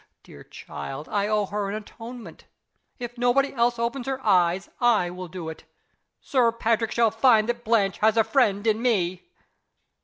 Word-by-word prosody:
Dear -, -, -14 dB
child! 140 Hz, +3 st, -8 dB
I 205 Hz, 0 st, 0 dB
owe 210 Hz, -1 st, +1 dB
her 205 Hz, 0 st, -3 dB
an 200 Hz, -, -3 dB
atonement. 225 Hz, -2 st, -10 dB, 0.5 s
If 240 Hz, 0 st, -7 dB
nobody 255 Hz, +3 st, +2 dB
else 240 Hz, -1 st, +1 dB
opens 240 Hz, +2 st, -3 dB
her 270 Hz, -1 st, -2 dB
eyes, 180 Hz, -2 st, +2 dB
I 220 Hz, -8 st, +2 dB
will 180 Hz, 0 st, -7 dB
do 175 Hz, -1 st, -7 dB
it. 160 Hz, -, -8 dB, 0.5 s
Sir 245 Hz, -4 st, +2 dB
Patrick 230 Hz, -1 st, 0 dB
shall 230 Hz, -2 st, +2 dB
find 225 Hz, -1 st, +4 dB
that 240 Hz, 0 st, -3 dB
Blanche 215 Hz, -4 st, +1 dB
has 220 Hz, +1 st, +3 dB
a 225 Hz, -, +5 dB
friend 220 Hz, -3 st, +1 dB
in 220 Hz, 0 st, +1 dB
Me!" 190 Hz, -, 0 dB
225 Hz, 165 wpm, -25 LUFS, 195-240 Hz, 0.5 s, a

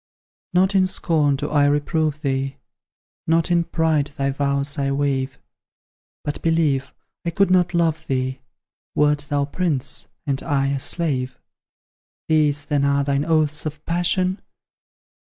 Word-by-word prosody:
Not 190 Hz, +2 st, +3 dB
in 190 Hz, -1 st, +4 dB
scorn 155 Hz, -6 st, +1 dB
do 145 Hz, +2 st, -4 dB
I 145 Hz, -1 st, +4 dB
reprove 150 Hz, +1 st, 0 dB
thee, 135 Hz, 0 st, -1 dB, 0.7 s
Not 165 Hz, +2 st, +2 dB
in 170 Hz, -1 st, +3 dB
pride 160 Hz, -3 st, +1 dB
thy 140 Hz, -1 st, -2 dB
vows 140 Hz, +1 st, -1 dB
I 140 Hz, 0 st, 0 dB
waive, 135 Hz, -1 st, -1 dB, 0.9 s
But, 145 Hz, -, -4 dB
believe, 155 Hz, -5 st, +1 dB, 0.3 s
I 170 Hz, -, -1 dB
could 195 Hz, +3 st, +2 dB
not 180 Hz, -1 st, +3 dB
love 165 Hz, -2 st, +1 dB
thee, 130 Hz, 0 st, -2 dB, 0.5 s
Wert 150 Hz, -1 st, +2 dB
thou 145 Hz, -1 st, +1 dB
prince, 145 Hz, -3 st, -1 dB, 0.2 s
and 135 Hz, -2 st, -1 dB
I 135 Hz, -1 st, 0 dB
a 140 Hz, -1 st, -1 dB
slave. 130 Hz, -5 st, -1 dB, 0.9 s
These, 150 Hz, -2 st, +2 dB
then, 145 Hz, -2 st, 0 dB
are 140 Hz, 0 st, +2 dB
thine 140 Hz, +1 st, 0 dB
oaths 155 Hz, -2 st, +1 dB
of 150 Hz, 0 st, -8 dB
passion? 180 Hz, +2 st, +1 dB
145 Hz, 140 wpm, -22 LUFS, 140-165 Hz, 0.9 s, in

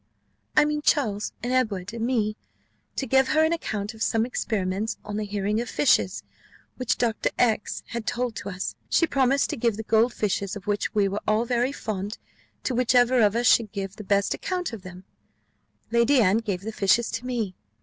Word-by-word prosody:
"I -, -, +7 dB
mean 300 Hz, 0 st, -1 dB
Charles, 220 Hz, -9 st, +1 dB
and 245 Hz, +1 st, -1 dB
Edward, 210 Hz, -7 st, 0 dB
and 230 Hz, -1 st, -4 dB
me, 225 Hz, -4 st, 0 dB, 0.6 s
to 270 Hz, -, -2 dB
give 265 Hz, +2 st, +3 dB
her 310 Hz, 0 st, +3 dB
an 320 Hz, +1 st, +2 dB
account 215 Hz, -10 st, -3 dB
of 220 Hz, -, -14 dB
some 225 Hz, 0 st, +2 dB
experiments, 210 Hz, -3 st, -2 dB
on 205 Hz, 0 st, -4 dB
the 215 Hz, -, -2 dB
hearing 205 Hz, +2 st, -1 dB
of 240 Hz, -, -5 dB
fishes, 290 Hz, -, +2 dB, 0.5 s
which 255 Hz, -2 st, 0 dB
Dr. 230 Hz, -3 st, 0 dB
X 220 Hz, -4 st, +1 dB
had 235 Hz, -1 st, -5 dB
told 245 Hz, -2 st, -1 dB
to 200 Hz, -, -5 dB
us: 185 Hz, -1 st, -4 dB, 0.2 s
she 335 Hz, -, +4 dB
promised 275 Hz, -2 st, +2 dB
to 305 Hz, -, -3 dB
give 230 Hz, -3 st, +1 dB
the 220 Hz, -, -4 dB
gold 225 Hz, +3 st, +3 dB
fishes, 200 Hz, -2 st, -2 dB
of 205 Hz, -, -9 dB
which 205 Hz, -1 st, -1 dB
we 205 Hz, -2 st, +3 dB
were 200 Hz, +2 st, -3 dB
all 215 Hz, +2 st, +2 dB
very 245 Hz, +2 st, +1 dB
fond, 210 Hz, -5 st, -4 dB, 0.5 s
to 260 Hz, -, -1 dB
whichever 245 Hz, 0 st, +4 dB
of 210 Hz, 0 st, +4 dB
us 240 Hz, +1 st, +1 dB
should 225 Hz, -3 st, +4 dB
give 195 Hz, 0 st, -5 dB
the 215 Hz, -, -7 dB
best 200 Hz, 0 st, +1 dB
account 360 Hz, -7 st, -3 dB
of 220 Hz, -, -6 dB
them 185 Hz, 0 st, -11 dB, 0.9 s
Lady 235 Hz, +4 st, +4 dB
Anne 200 Hz, -2 st, +4 dB
gave 200 Hz, -6 st, -3 dB
the 220 Hz, -, -4 dB
fishes 215 Hz, +3 st, +2 dB
to 245 Hz, -, -4 dB
me." 230 Hz, -7 st, -2 dB
225 Hz, 200 wpm, -25 LUFS, 205-245 Hz, 0.9 s, I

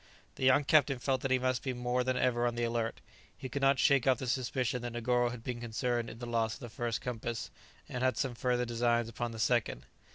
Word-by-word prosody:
The 130 Hz, -, -3 dB
young 130 Hz, +3 st, +5 dB
captain 140 Hz, -2 st, +4 dB
felt 130 Hz, +1 st, 0 dB
that 135 Hz, -, -1 dB
he 130 Hz, -, +4 dB
must 130 Hz, 0 st, 0 dB
be 130 Hz, -, -2 dB
more 125 Hz, +1 st, 0 dB
than 130 Hz, 0 st, 0 dB
ever 120 Hz, -1 st, +2 dB
on 120 Hz, -, -2 dB
the 120 Hz, -, -1 dB
alert; 115 Hz, -1 st, -1 dB, 0.4 s
he 130 Hz, -, -6 dB
could 140 Hz, +3 st, -3 dB
not 135 Hz, 0 st, +4 dB
shake 135 Hz, -1 st, +3 dB
off 130 Hz, -, +5 dB
the 130 Hz, -, -5 dB
suspicion 125 Hz, 0 st, -1 dB
that 120 Hz, -1 st, -5 dB
Negoro 120 Hz, +1 st, +1 dB
had 120 Hz, -2 st, -8 dB
been 120 Hz, -1 st, -4 dB
concerned 120 Hz, 0 st, -1 dB
in 110 Hz, -, -9 dB
the 120 Hz, -, -6 dB
loss 115 Hz, -2 st, 0 dB
of -, -, -13 dB
the 120 Hz, -, -8 dB
first 115 Hz, +1 st, -3 dB
compass, 120 Hz, -1 st, -4 dB, 0.4 s
and 125 Hz, 0 st, -4 dB
had 130 Hz, 0 st, +2 dB
some 130 Hz, -2 st, -1 dB
further 125 Hz, +1 st, 0 dB
designs 120 Hz, 0 st, +1 dB
upon 120 Hz, +1 st, -4 dB
the 115 Hz, -, -8 dB
second. 110 Hz, -, 0 dB
120 Hz, 240 wpm, -32 LUFS, 120-130 Hz, 0.4 s, young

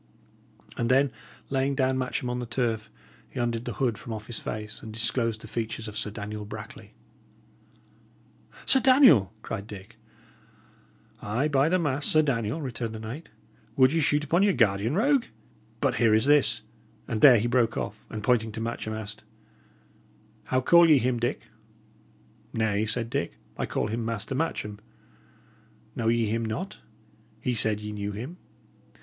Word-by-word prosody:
And 115 Hz, -, 0 dB
then 135 Hz, +1 st, +4 dB, 0.4 s
laying 135 Hz, +1 st, +1 dB
down 130 Hz, -1 st, +2 dB
Matcham 130 Hz, -1 st, -2 dB
on 125 Hz, 0 st, -2 dB
the 120 Hz, -, -5 dB
turf, 115 Hz, -3 st, -1 dB, 0.4 s
he -, -, -7 dB
undid 120 Hz, -1 st, -1 dB
the 120 Hz, -, -3 dB
hood 120 Hz, -3 st, 0 dB
from 115 Hz, -, -6 dB
off 110 Hz, -1 st, -6 dB
his 115 Hz, -1 st, -5 dB
face, 110 Hz, 0 st, -6 dB
and 110 Hz, -, -8 dB
disclosed 115 Hz, 0 st, 0 dB
the -, -, -9 dB
features 115 Hz, 0 st, -4 dB
of 105 Hz, -, -8 dB
Sir 105 Hz, -, -1 dB
Daniel 105 Hz, 0 st, -6 dB
Brackley. 105 Hz, -, -10 dB, 1.7 s
"Sir 265 Hz, -, +5 dB
Daniel!" 255 Hz, -, +6 dB
cried 100 Hz, +1 st, -5 dB
Dick. 105 Hz, +2 st, -11 dB, 1.2 s
"Ay, 120 Hz, +8 st, 0 dB
by 140 Hz, +1 st, +3 dB
the 185 Hz, -, +3 dB
mass, 145 Hz, -4 st, 0 dB
Sir 155 Hz, 0 st, +5 dB
Daniel!" 120 Hz, -1 st, -1 dB
returned 120 Hz, -3 st, -4 dB
the -, -, -6 dB
knight. 115 Hz, +9 st, -7 dB, 0.5 s
"Would 130 Hz, +1 st, +5 dB
ye 165 Hz, -, +2 dB
shoot 145 Hz, 0 st, +2 dB
upon 165 Hz, +5 st, +2 dB
your 200 Hz, -1 st, +4 dB
guardian, 110 Hz, -, +2 dB
rogue? 270 Hz, +5 st, +3 dB, 0.6 s
But -, -, +1 dB
here 110 Hz, -2 st, +4 dB
is 110 Hz, -, +2 dB
this" 130 Hz, -6 st, +3 dB, 0.4 s
And 115 Hz, -4 st, -2 dB
there 130 Hz, -5 st, +9 dB
he 110 Hz, -, 0 dB
broke 120 Hz, -2 st, +2 dB
off, 110 Hz, -, -4 dB
and 110 Hz, -1 st, -6 dB
pointing 115 Hz, -2 st, +2 dB
to 110 Hz, -, -5 dB
Matcham, 110 Hz, -1 st, -3 dB
asked: 105 Hz, -1 st, -7 dB, 1.2 s
"How 130 Hz, 0 st, +1 dB
call 170 Hz, +5 st, +6 dB
ye 150 Hz, -, +7 dB
him, 125 Hz, -1 st, 0 dB
Dick?" 120 Hz, +3 st, -1 dB, 1.1 s
"Nay," 110 Hz, -1 st, +1 dB
said 115 Hz, +1 st, -2 dB
Dick, 140 Hz, +1 st, -2 dB, 0.2 s
"I -, -, -3 dB
call -, -, -1 dB
him 115 Hz, +2 st, -2 dB
Master 115 Hz, +1 st, -3 dB
Matcham. 115 Hz, -8 st, -2 dB, 1.2 s
Know 115 Hz, -, -1 dB
ye 115 Hz, 0 st, +3 dB
him 115 Hz, +2 st, -1 dB
not? 140 Hz, -, -4 dB, 0.6 s
He 125 Hz, -, -1 dB
said 110 Hz, -2 st, +1 dB
ye 105 Hz, 0 st, -5 dB
knew 105 Hz, -1 st, -4 dB
him!" 125 Hz, -, -7 dB
115 Hz, 165 wpm, -27 LUFS, 110-135 Hz, 1.7 s, there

